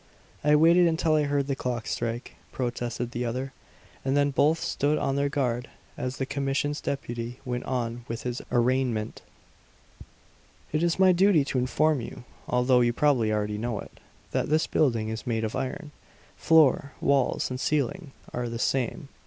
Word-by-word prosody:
"I 150 0 +5
waited 170 +3 +6
until 160 -1 +1
I 150 -1 +3
heard 140 -1 0
the 140 -1 -1
clock 120 -2 -3
strike," 120 +1 -3 0.2
protested 120 -1 -3
the 120 - -3
other; 130 +3 -3 0.5
and 135 +1 +1
then 145 0 +3
both 150 +4 +3
stood 145 +2 0
on 135 - 0
their 140 0 +1
guard 125 -4 -1 0.3
as 125 0 -4
the 135 - -1
commission's 140 +2 -1
deputy 120 -3 -4
went 125 -1 -3
on 120 -2 -3
with 115 +1 -5
his 125 0 -3
arraignment: 120 -3 0 1.5
"It 155 - 0
is 170 -1 +1
my 190 0 +6
duty 180 -4 +4
to 135 - -1
inform 145 +3 +1
you, 115 - -8 0.2
although 125 0 +3
you 120 0 +2
probably 125 -5 +2
already 105 0 -1
know 115 -2 -2
it, - - -9 0.4
that - - -1
this 155 +1 +3
building 115 -7 +1
is 110 +3 -5
made 115 -2 0
of 110 - -2
iron. 140 +3 -4 0.4
Floor, 150 -4 +4
walls, 140 -2 +1
and 125 - -4
ceiling 150 +3 -1 0.2
are 120 -1 -2
the 115 - -4
same." 135 +5 -1
130 Hz, 170 wpm, -27 LUFS, 120-145 Hz, 1.5 s, waited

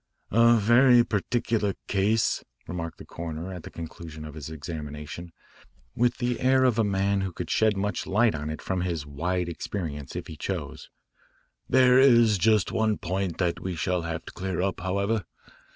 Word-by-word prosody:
"A 115 +2 +6
very 120 +3 +6
peculiar 110 -1 0
case," 105 +3 +1 0.2
remarked 85 -2 -5
the - - -11
coroner 85 +2 -6
at 90 - -7
the - - -9
conclusion 80 -1 -8
of 75 - -8
his 75 -1 -7
examination, 75 +1 -7 0.6
with 120 +1 +2
the 120 -1 -1
air 130 0 +4
of 120 -3 +3
a - - +4
man 100 0 +1
who 95 -1 -2
could - - -5
shed 110 -2 +3
much 100 -1 -2
light 110 +3 +3
on 75 0 -4
it 75 -1 -6
from 95 -2 -1
his 85 -5 -2
wide 85 +5 -2
experience 80 -5 -5
if - - -4
he 80 - -9
chose. - - -5 0.8
"There 130 -1 +6
is 115 -6 +5
just 105 0 +3
one 110 -1 +1
point 95 -1 -2
that 90 -2 0
we 95 -1 -4
shall 90 +2 0
have 85 0 -5
to - - -10
clear 95 -2 -3
up, 95 0 -1
however. 100 +4 0
95 Hz, 175 wpm, -26 LUFS, 85-110 Hz, 0.8 s, A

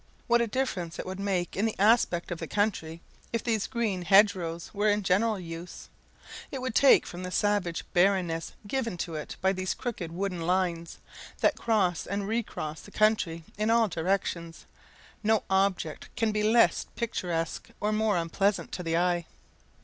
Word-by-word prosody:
What 235 0 +3
a 235 - +1
difference 205 -9 -2
it - - -5
would 185 +1 -6
make 190 -3 -1
in 200 - +1
the 220 - -4
aspect 200 -5 +3
of 170 - -3
the 165 - -5
country 170 -6 -1 0.3
if 230 - -1
these 220 -4 0
green 220 -7 -1
hedgerows 180 -3 +3
were 210 +1 +2
in 205 0 +1
general 205 +3 +2
use! 170 0 -8 0.6
It 270 - -5
would 255 -2 -3
take 275 +3 +6
from 175 - -7
the 180 - -4
savage 195 -3 0
barrenness 175 -3 +2
given 230 -3 -2
to 170 -1 -4
it 150 -1 -5
by 190 0 +4
these 185 -1 -2
crooked 205 -10 -4
wooden 180 0 -3
lines, 170 -1 -1 0.4
that - - +4
cross 200 -7 +1
and 200 0 -2
recross 200 -9 -3
the - - -13
country 205 -6 +1 0.2
in 215 +1 +1
all 230 -1 +4
directions: 170 -1 -2 0.6
no 220 0 +2
object 190 -5 0
can 225 -2 +1
be 210 0 0
less 225 +2 +4
picturesque 175 -8 -3
or 210 - 0
more 215 -2 +2
unpleasing 190 +4 0
to - - -5
the 165 -1 0
eye. 175 -1 +1
195 Hz, 170 wpm, -28 LUFS, 170-215 Hz, 0.6 s, take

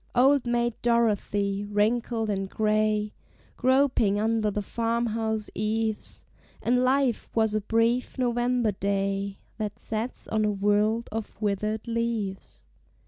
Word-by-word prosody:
Old 265 +1 +4
Maid 240 0 +1
Dorothy, 205 -4 +1
wrinkled 220 +2 0
and 195 -2 -2
gray, 215 0 +1 0.4
Groping 255 -6 +3
under 220 0 +1
the 205 0 -2
farm 230 +3 -1
house 220 -1 -2
eaves, 215 0 -2 0.3
And 250 +1 +2
life 260 -2 +1
was 220 -2 +2
a 215 - +1
brief 230 +5 +1
November 240 -2 +1
day 195 0 -1 0.2
That 210 -1 -3
sets 225 +3 -4
on 220 -1 +1
a 210 - +2
world 210 +3 +1
of 220 -2 -5
withered 210 +2 -1
leaves! 230 -4 -3
220 Hz, 125 wpm, -27 LUFS, 210-235 Hz, 0.4 s, Old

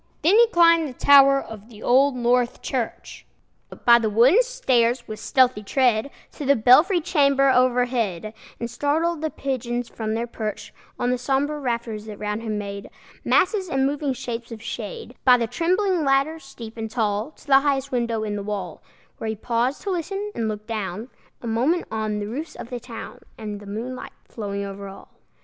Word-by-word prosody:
Then 345 +6 +5
he 470 +1 +7
climbed 335 -5 +4
the - - -9
tower 275 +1 +6
of 220 -3 -10
the 215 -2 -13
Old 265 +2 +4
North 245 0 +1
Church, 245 -4 -4 0.6
By 235 0 +7
the 220 -2 0
wooden 250 - +5
stairs, 255 - +1
with 215 0 -7
stealthy 250 -2 +2
tread, 240 +2 +1 0.2
To - - -8
the 280 0 +4
belfry 285 - +5
chamber 280 -5 +3
overhead, 245 -6 +1 0.3
And 235 - -3
startled 300 +7 -1
the 315 - -1
pigeons 245 -4 -3
from 220 -1 -3
their 230 +1 -1
perch 215 -3 -6 0.2
On 245 - 0
the 250 - -1
sombre 275 +4 0
rafters, 235 -5 -3
that 210 -2 -8
round 210 +1 -3
him 215 -2 -3
made 200 -1 -6 0.3
Masses 375 -1 +2
and 270 -2 +1
moving 285 0 -1
shapes 235 -1 -6
of 225 - -7
shade, 230 +1 -7
By 250 -1 +7
the 235 - 0
trembling 360 - 0
ladder, 275 +3 +1
steep 235 -6 -11
and 220 0 -4
tall, 215 +1 -1
To - - -20
the 270 -2 +6
highest 275 -1 -1
window 235 -3 -1
in 210 -1 -3
the 205 - -3
wall, 200 -4 -5 0.4
Where 225 - -4
he 220 - -2
paused 240 +5 -1
to 400 - -2
listen 390 +4 -3
and 225 - -2
look 210 -1 -5
down 215 0 -4 0.3
A - - -4
moment 260 +10 +1
on 215 -1 -2
the 205 - -3
roofs 290 +9 -6
of 235 - -9
the 245 - -4
town, 235 -1 -9 0.2
And 210 -2 -6
the 205 - -12
moonlight 240 +5 -6
flowing 200 -2 -5
over 200 0 -7
all. 195 - -12
245 Hz, 185 wpm, -23 LUFS, 220-280 Hz, 0.6 s, he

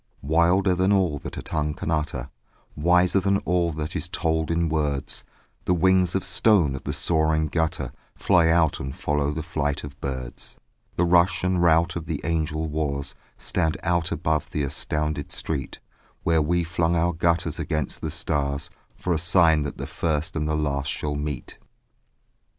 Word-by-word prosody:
Wilder 85 +6 +3
than 95 +2 +2
all 90 -7 +2
that - - -8
a - - -5
tongue 75 -1 -2
can 85 -2 -3
utter, 75 -4 -2 0.4
Wiser 90 +4 +3
than 100 +1 +2
all 85 -1 +1
that 75 +1 -4
is 85 - -3
told 80 -2 0
in 85 0 +1
words, 75 -3 -1 0.4
The 90 - +2
wings 95 0 +3
of 95 - 0
stone 90 -11 +3
of 65 - -8
the - - -1
soaring 80 -1 +2
gutter 80 +1 -1 0.2
Fly 90 -4 +3
out 80 -2 +3
and 65 0 -5
follow 75 0 0
the 75 +1 -3
flight 70 0 -2
of 75 - -6
the 70 - -24
birds; 65 -3 -6 0.4
The 90 - +2
rush 85 +1 +3
and 90 -1 +1
rout 85 0 +3
of 85 -2 -5
the - - -2
angel 80 0 -1
wars 70 -2 -2 0.2
Stand 80 -1 -1
out 85 -2 +1
above 80 -1 -1
the 75 - -2
astounded 75 +1 -2
street, 70 -5 -3 0.4
Where 80 -1 +3
we 85 +3 +1
flung 85 0 0
our 85 +1 +2
gutters 85 +1 0
against 75 -3 -2
the - - -2
stars 70 0 -1 0.2
For 90 - -1
a 80 - 0
sign 85 -2 +4
that 75 -1 -4
the - - -4
first 80 +1 -2
and 75 -1 -1
the 75 - +1
last 70 -2 -1
shall 75 +1 -2
meet. 75 -1 -5
80 Hz, 175 wpm, -25 LUFS, 75-85 Hz, 0.4 s, sign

